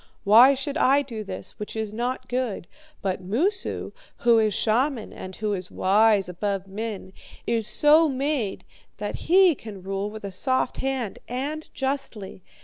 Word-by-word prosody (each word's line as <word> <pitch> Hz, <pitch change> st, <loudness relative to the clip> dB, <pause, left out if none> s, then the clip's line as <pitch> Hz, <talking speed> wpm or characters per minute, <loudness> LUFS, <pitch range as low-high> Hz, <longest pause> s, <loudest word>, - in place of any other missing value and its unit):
Why 235 Hz, +7 st, +7 dB
should 275 Hz, +3 st, -3 dB
I 280 Hz, 0 st, +4 dB
do 230 Hz, -5 st, -6 dB
this, 210 Hz, -, -7 dB
which 210 Hz, -, -6 dB
is 220 Hz, -1 st, -3 dB
not 250 Hz, +3 st, -3 dB
good? 245 Hz, -7 st, -2 dB, 0.4 s
But 190 Hz, -1 st, -2 dB
Moosu, 340 Hz, -, -1 dB, 0.3 s
who 235 Hz, -1 st, +5 dB
is 215 Hz, -1 st, +2 dB
shaman, 235 Hz, +3 st, 0 dB
and 185 Hz, 0 st, -8 dB
who 210 Hz, +2 st, -2 dB
is 180 Hz, -2 st, -5 dB
wise 205 Hz, 0 st, +3 dB
above 195 Hz, +2 st, -3 dB
men, 200 Hz, -1 st, -6 dB, 0.3 s
is 230 Hz, -2 st, 0 dB
so 310 Hz, +2 st, +5 dB
made 270 Hz, -6 st, -2 dB, 0.3 s
that -, -, -5 dB
he 370 Hz, 0 st, +6 dB
can 210 Hz, -8 st, -10 dB
rule 195 Hz, +1 st, -3 dB
with 215 Hz, 0 st, -9 dB
a 200 Hz, -, -5 dB
soft 255 Hz, +7 st, 0 dB
hand 265 Hz, -6 st, -3 dB
and 285 Hz, +5 st, -4 dB
justly. 265 Hz, -9 st, -4 dB
225 Hz, 155 wpm, -25 LUFS, 200-270 Hz, 0.4 s, Why